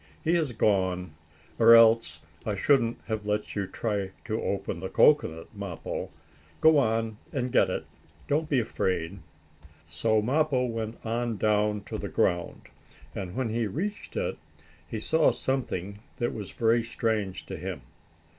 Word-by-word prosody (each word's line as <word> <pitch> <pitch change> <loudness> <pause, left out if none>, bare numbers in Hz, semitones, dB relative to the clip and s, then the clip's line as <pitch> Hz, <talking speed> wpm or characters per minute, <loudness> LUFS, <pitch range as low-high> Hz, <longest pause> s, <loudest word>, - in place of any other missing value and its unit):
He 165 - +2
has 160 -6 +1
gone, 95 -5 +1 0.5
or 115 0 +9
else 115 0 +5 0.2
I - - -2
shouldn't 120 -5 +2
have 110 -2 -3
let 105 0 -1
you 100 -2 -1
try 100 -3 -2 0.2
to 110 -2 -2
open 100 - -2
the - - -5
cocoanut, 80 +6 +3
Mappo. 100 -5 -5 0.5
Go 160 -2 +6
on 115 -3 0
and 125 -2 -2
get - - +4
it; - - -3 0.4
don't 155 +2 0
be 135 - +3
afraid." 95 -5 -2 0.7
So 110 -1 +1
Mappo 130 +3 +1
went 115 -1 -5
on 115 0 -1
down 105 0 +1
to - - -5
the - - -4
ground. 85 0 0 0.5
And, 95 -2 -5
when 130 -3 -1
he 115 0 0
reached 200 - -4
it, - - -2 0.5
he 110 - -4
saw 160 +8 +3
something 100 -7 -2 0.2
that 120 - -1
was 105 -3 -6
very 115 +1 +2
strange 110 -4 -2
to - - -6
him. 90 -5 -6
110 Hz, 150 wpm, -28 LUFS, 100-120 Hz, 0.7 s, or